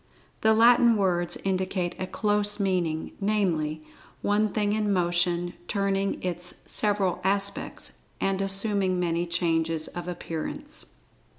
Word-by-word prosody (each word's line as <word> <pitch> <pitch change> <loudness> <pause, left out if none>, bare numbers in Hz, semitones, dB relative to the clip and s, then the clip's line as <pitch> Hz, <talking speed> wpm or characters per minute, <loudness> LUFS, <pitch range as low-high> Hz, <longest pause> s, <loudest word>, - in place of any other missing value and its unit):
The 220 0 +5
Latin 235 0 +6
words 175 -4 +1
indicate 185 -2 -1
a 185 - -2
close 205 +1 +1
meaning, 180 -5 0
namely, 165 -7 0 0.4
One 210 +1 +2
thing 205 0 0
in 210 -1 +1
motion, 175 -1 +1
turning 195 -1 0
its 180 0 -3
several 200 -4 0
aspects, 200 +1 -2 0.2
and 195 0 0
assuming 195 -1 +1
many 170 0 0
changes 165 -2 +1
of 175 0 -7
appearance. 165 -2 -6
190 Hz, 115 wpm, -27 LUFS, 175-205 Hz, 0.4 s, Latin